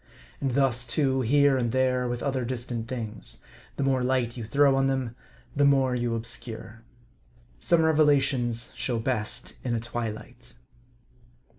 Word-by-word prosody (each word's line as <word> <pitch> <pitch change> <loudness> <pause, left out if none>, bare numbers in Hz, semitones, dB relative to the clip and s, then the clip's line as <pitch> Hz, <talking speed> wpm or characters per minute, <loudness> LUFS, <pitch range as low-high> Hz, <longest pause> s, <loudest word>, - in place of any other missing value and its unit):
And 135 -3 -1
thus, 125 -3 +2
too, 135 +1 +1
here 140 +2 +4
and 120 -3 0
there, 130 -1 +1
with 120 0 -3
other 135 -3 -1
distant 120 -2 -4
things: 115 -4 -4 0.3
the - - -2
more 135 -1 +2
light 125 -2 0
you 120 - -5
throw 140 +4 +3
on 135 0 +2
them, 130 -3 -2 0.4
the 145 - +3
more 135 -2 +4
you 120 -1 -1
obscure. 115 0 -6 0.8
Some 165 - +3
revelations 135 -6 +2
show 120 -3 -1
best 110 -2 -2
in 120 -2 -1
a - - 0
twilight. 120 +1 -6
125 Hz, 145 wpm, -27 LUFS, 120-135 Hz, 0.8 s, here